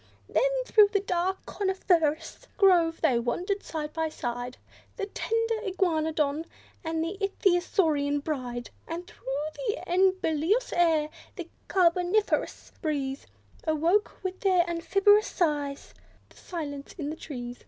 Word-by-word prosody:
Then, - - +1
through 425 -4 +6
the 405 - +2
dark 375 0 -1
coniferous 375 0 0
grove 345 -5 +4
they 260 -7 +3
wandered 360 - -1
side 305 -2 -5
by 320 -1 -1
side, 245 -3 -5 0.4
The 410 - -3
tender 455 +2 -1
Iguanodon 320 -6 0 0.4
and 320 0 -1
Ichthyosaurian 350 -6 +1
bride 250 -6 -4 0.2
And 340 +2 -5
through - - -19 0.4
the 425 - -2
enubilious 370 +2 +2
air, 320 -3 +3 0.3
the 350 -4 -6 0.2
carboniferous 360 +3 +1
breeze, 280 -4 -2 0.4
Awoke, 330 +9 +1
with 375 0 -3
their 365 -3 +3
amphibious 395 +5 +3
sighs, 290 -5 -1 0.4
the - - -21
silence 290 -5 -6
in 300 -3 -3
the - - -5
trees. 245 -6 -7
335 Hz, 120 wpm, -28 LUFS, 300-385 Hz, 0.4 s, through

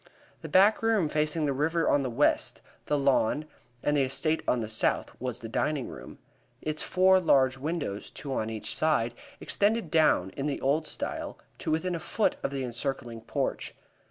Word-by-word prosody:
The - - -7
back 200 +3 +5
room 220 -8 +2
facing 155 +1 0
the 140 - +1
river 160 +4 +1
on 145 - +3
the 130 - -2
west, 125 +5 +1 0.3
the 150 - +2
lawn 140 +1 +2 0.4
and 145 - +2
the 145 - +3
estate 135 +4 +1
on 125 - +2
the 110 - -3
south, 110 0 0
was 125 -2 -4
the 115 - -6
dining 140 +4 -1
room. - - -10 0.4
Its 155 0 -2
four 190 +1 +4
large 135 -6 +3
windows, 145 -9 -3
two 140 -2 -6
on 110 -3 -1
each 110 -1 -4
side, 135 -7 +1 0.3
extended 205 -4 0
down, 150 - +3
in 140 +8 -3
the 145 - -2
old 150 +4 +1
style, - - -5 0.2
to - - -4
within 170 +4 0
a 170 - -2
foot 205 +6 0
of - - -1
the 135 -1 -3
encircling 120 -1 -4
porch. 115 - -3
145 Hz, 185 wpm, -28 LUFS, 130-160 Hz, 0.4 s, back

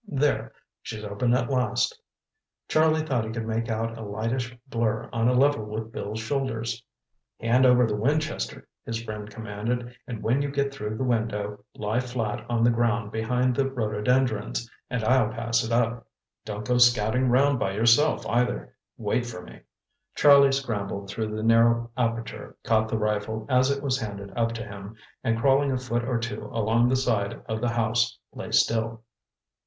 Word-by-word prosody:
"There—she's 115 - -3
open 105 +4 +1
at 125 - 0
last." 125 -2 0 0.7
Charlie 155 0 +3
thought 130 -7 0
he 110 - -5
could 115 -1 -4
make 115 +1 -2
out 115 +1 -2
a - - -6
lightish 115 +4 -3
blur 115 -4 -1
on 115 0 +1
a 125 - +3
level 140 -2 +3
with 110 +1 -5
Bill's 105 +1 -5
shoulders. 115 -2 -2 0.6
"Hand 125 +3 +4
over 125 0 +5
the 105 -2 -1
Winchester," 135 - -1 0.2
his 115 0 -4
friend 105 -2 -6
commanded, 115 +3 -4
"and 115 -3 -6
when 125 +5 +2
you 145 - -1
get 140 0 -1
through 110 -4 -4
the 130 - -1
window, 105 -4 -1
lie 105 +3 -1
flat 120 -4 -3
on 120 -1 +1
the 120 - +5
ground 115 -2 0
behind 125 +3 0
the 135 0 +1
rhododendrons, 110 - 0 0.2
and 125 -2 -2
I'll 125 -1 +3
pass 115 +2 0
it 115 - -4
up. 115 0 0 0.4
Don't 105 0 -5
go 125 0 +2
scouting 120 +1 +4
round 135 +2 +3
by 95 - -1
yourself, 115 +8 +3
either. 125 +1 0 0.2
Wait 120 -1 -1
for 90 -7 -7
me." - - -12 0.6
Charlie 140 -1 +7
scrambled 100 -7 -3
through 110 -1 -3
the 110 - -3
narrow 115 +1 +4
aperture, 115 -2 -3
caught 110 -1 +2
the 110 - 0
rifle 105 +1 -1
as 130 +1 +4
it 140 0 -1
was 135 -1 0
handed 100 -2 -6
up 115 -1 +1
to 115 0 -5
him, 100 -1 -9 0.3
and 115 0 +1
crawling 135 +3 +3
a 130 - +1
foot 120 -2 -2
or 120 0 0
two 115 +1 -4
along 115 +2 +2
the 130 - +3
side 115 -6 0
of 110 0 -3
the 120 - +1
house, 115 0 +1 0.2
lay - - -7
still. 115 0 +1
115 Hz, 175 wpm, -26 LUFS, 110-125 Hz, 0.7 s, Charlie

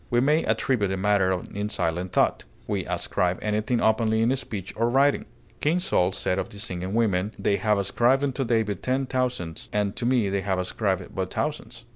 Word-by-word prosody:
We 120 - +3
may 150 +5 +3
attribute 115 -8 +1
a 95 - -1
matter 95 -1 +2 0.2
in 105 +1 -2
silent 90 -1 -2
thought; - - +2 0.2
we - - -2
ascribe 90 0 0
anything 110 +3 0
openly 110 0 +3
in 125 +4 +3
speech 105 -8 -5
or 115 +1 +1
writing; 140 +3 +3 0.3
King 155 +6 +2
Saul 95 - +1
said 95 0 -1
of 95 - -3
the 105 - -12
singing 95 -2 -4
women, 105 -3 +1
"They 100 - +1
have 105 +1 +2
ascribed 120 +7 +2
unto 135 -1 0
David 110 -6 0
ten 130 +1 0
thousands, 125 -10 -3
and 105 -1 0
to 120 -1 -1
me 125 -5 +3
they 100 0 0
have 95 0 -1
ascribed 95 0 -2
but 95 -1 -3
thousands." 125 -6 -4
105 Hz, 190 wpm, -25 LUFS, 95-125 Hz, 0.3 s, We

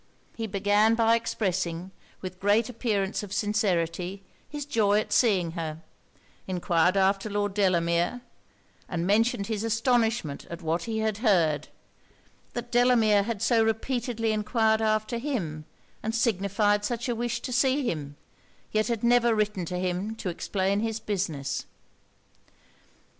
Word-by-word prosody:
He 225 -1 -3
began 205 +2 +3
by 230 0 +4
expressing, 185 -5 -2 0.3
with 185 -1 -7
great 205 +4 +2
appearance 215 -5 -1
of 205 -2 -8
sincerity, 195 -3 -1 0.3
his 295 -1 -5
joy 215 -7 +2
at - - -3
seeing 190 -8 +3
her; 160 -1 -5 0.6
enquired 180 0 +2
after 195 +2 +2
Lord 205 -1 -1
Delamere, 175 +2 +1 0.7
and 170 -1 -2
mentioned 210 +1 +2
his 215 0 -3
astonishment 225 - 0
at 170 +1 -8
what 165 +2 -1
he 225 -1 -3
had 215 -1 -1
heard 165 - +2 0.9
that 240 0 -5
Delamere 235 -4 +4
had 220 0 -3
so 230 -1 +4
repeatedly 225 0 -1
enquired 220 +1 +1
after 215 +2 0
him, 175 - -3 0.4
and 220 +1 -2
signified 205 -2 +1
such 240 +2 -2
a 240 - 0
wish 235 0 -2
to 250 - -4
see 265 +3 +2
him, 145 -6 -4 0.6
yet 215 0 +1
had 235 -2 -2
never 240 -1 +4
written 210 -4 0
to 180 +2 -4
him 185 +4 -2
to 200 - -4
explain 195 +3 -1
his 225 0 -2
business. 170 -10 -3
210 Hz, 135 wpm, -27 LUFS, 185-230 Hz, 0.9 s, by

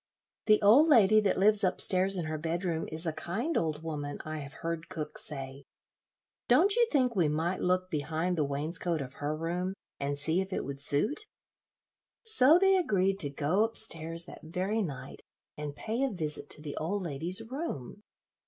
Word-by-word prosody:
The 215 -1 +5
old 245 +10 +6
lady 215 -7 +5
that 205 -3 0
lives 205 +1 +5
up 185 - 0
stairs 190 +1 +3
in 170 - -3
her 155 0 -4
bedroom 165 +1 -3
is 160 +2 -1
a 160 - -1
kind 225 - -4
old 155 -1 -2
woman, 145 -3 -5
I 155 0 -5
have 140 0 -9
heard 165 -1 -4
cook 155 -5 -6
say. 135 -1 -8 0.8
Don't 395 +2 +4
you 480 -1 +3
think 255 -5 +1
we 175 -5 +2
might 165 +5 -2
look 185 0 0
behind 160 +4 -2
the 155 - 0
wainscot 155 +4 -2
of 130 -2 -7
her 150 +1 -2
room, 175 +4 -3 0.2
and 140 0 -3
see 160 +5 +1
if 190 +1 -7
it - - -3
would 140 0 -7
suit?" 205 - +2 1.0
So 325 - +7
they 385 +1 +3
agreed 195 - 0
to 145 - 0
go 150 +9 0
up 225 0 +5
stairs 165 -4 +2
that - - -12
very 185 +7 -3
night 145 -10 -7 0.3
and 150 -1 -7
pay 225 - -4
a 275 - +1
visit 155 - -5
to 150 - -5
the 145 -2 -6
old 190 +5 -3
lady's 170 +6 0
room. 210 - -6
170 Hz, 185 wpm, -29 LUFS, 150-205 Hz, 1.0 s, So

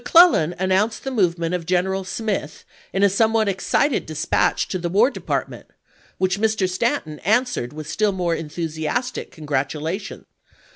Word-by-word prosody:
McClellan 245 - +5
announced 190 +4 +1
the 270 - -3
movement 175 -7 +1
of 175 -2 -3
General 190 +1 +1
Smith 190 -5 -4 0.3
in 195 - 0
a - - +8
somewhat 220 +2 +2
excited 200 +8 +1
dispatch 155 +1 +1
to 185 - -2
the 175 0 -2
War 215 +9 +4
Department, - - -4 0.5
which 190 +1 0
Mr. 220 -3 +2
Stanton 185 - -1
answered 220 - +1
with 155 0 -8
still 210 +6 +1
more 180 -3 -1
enthusiastic 160 +8 -3
congratulation. 155 +5 -3
185 Hz, 140 wpm, -22 LUFS, 165-220 Hz, 0.5 s, a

